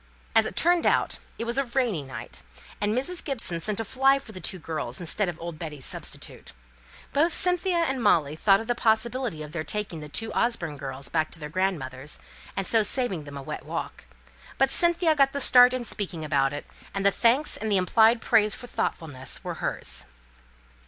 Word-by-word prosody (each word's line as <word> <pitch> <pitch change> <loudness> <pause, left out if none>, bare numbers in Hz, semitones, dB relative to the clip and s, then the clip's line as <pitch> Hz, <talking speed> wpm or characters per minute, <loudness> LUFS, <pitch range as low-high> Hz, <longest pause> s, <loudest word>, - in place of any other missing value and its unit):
As - - +5
it - - -7
turned 345 0 +3
out, - - +1 0.2
it - - -3
was 235 +3 -1
a - - +2
rainy 240 - 0
night, 125 - -9 0.4
and 210 +3 +1
Mrs. 345 +7 -1
Gibson 230 - -2
sent 210 +5 -2
a 225 - -2
fly 270 +4 +3
for 270 -5 -10
the 185 - -8
two 185 - -3
girls 155 -7 -4
instead 180 +3 +1
of 170 - -7
old 170 -2 -7
Betty's 150 -5 -6
substitute. - - -5 0.6
Both 325 +4 +3
Cynthia 360 0 +2
and 270 -7 0
Molly 155 -9 +3
thought 195 +4 +4
of 225 - -6
the 240 - +1
possibility 230 -5 0
of 150 - -9
their 160 -1 -3
taking 200 -1 -4
the 150 -1 -9
two 225 +9 -4
Orford 170 - 0
girls 135 0 -6
back 155 -1 0
to 170 - -10
their 150 -1 -6
grandmother's, 150 -6 -3 0.4
and 195 - 0
so 225 +2 +3
saving 205 - 0
them 145 -1 -8
a 140 - -7
wet - - -6
walk; - - -6 0.5
but 270 0 +3
Cynthia 340 0 +4
got 275 -2 +3
the 280 - -2
start 250 -2 +7
in 255 -1 -3
speaking 180 -7 -3
about 135 -2 +2
it; 145 - -6 0.3
and 195 0 -2
the 200 - +6
thanks 245 +8 +2
and 220 0 -3
the 200 - +4
implied 225 +5 +4
praise 210 -1 +3
for - - -9
thoughtfulness 145 - -3
were - - -4
hers. - - -3
205 Hz, 200 wpm, -26 LUFS, 155-250 Hz, 0.6 s, start